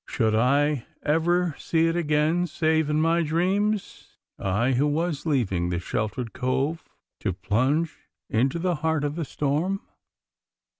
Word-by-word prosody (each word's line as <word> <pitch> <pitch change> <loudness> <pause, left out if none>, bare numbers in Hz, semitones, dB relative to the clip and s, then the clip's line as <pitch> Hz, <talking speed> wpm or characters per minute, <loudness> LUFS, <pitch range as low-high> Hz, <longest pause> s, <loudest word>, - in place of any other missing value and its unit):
Should 110 -3 +1
I 140 +3 +2 0.2
ever 170 +2 +2
see 165 0 +1
it 165 0 +1
again 160 +2 +1
save 160 -1 +1
in 150 0 +1
my 165 +2 +3
dreams 190 +6 -1 0.2
I, 105 +7 +1
who 135 +3 +2
was 160 +1 -1
leaving 95 - +1
this 85 0 -2
sheltered 110 +4 -3
cove 135 +5 -1 0.3
to - - -1
plunge 130 - 0 0.3
into 130 +8 +1
the 175 -1 0
heart 160 -2 +1
of 145 0 -1
the 165 0 -3
storm? 150 +9 -1
150 Hz, 140 wpm, -25 LUFS, 130-165 Hz, 0.3 s, my